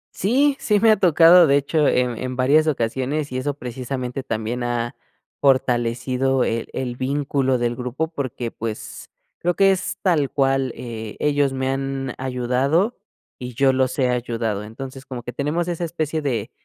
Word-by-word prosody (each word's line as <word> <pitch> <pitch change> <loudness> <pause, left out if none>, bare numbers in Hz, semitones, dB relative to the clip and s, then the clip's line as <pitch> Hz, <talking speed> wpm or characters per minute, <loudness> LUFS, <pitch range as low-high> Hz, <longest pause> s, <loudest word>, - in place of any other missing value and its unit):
Sí, 270 +8 +2
sí 210 -1 +2
me 225 +1 +5
ha 215 - +6
tocado, 170 -1 +7
de 140 +1 +4
hecho, 145 +1 +1
en 125 -2 +1
en 130 0 -4
varias 145 +5 +3
ocasiones 135 +2 -1
y 130 - -2
eso 145 +2 -2
precisamente 125 0 -5
también 115 0 -3
ha 120 0 -2 0.5
fortalecido 125 0 +1
el 115 0 -2
el 125 -2 -4
vínculo 135 -1 0
del 120 0 -1
grupo 125 +6 -3
porque, 130 -6 -4
pues, 110 -1 -6 0.3
creo 175 0 0
que 195 0 +5
es 185 -1 -2
tal 155 -7 +2
cual, 135 -2 +1
eh, 110 -3 -7
ellos 145 -2 +2
me 130 0 -2
han 135 -1 -3
ayudado 130 - 0 0.4
y 125 -1 -7
yo 135 0 +3
los 130 0 0
he 130 -2 +2
ayudado. 115 -4 -2
Entonces 130 +5 -9
como 125 -3 -6
que 125 - -6
tenemos 155 +4 -1
esa 175 0 -3
especie 160 -2 -2
de 120 -5 -2
130 Hz, 165 wpm, -22 LUFS, 125-150 Hz, 0.5 s, tocado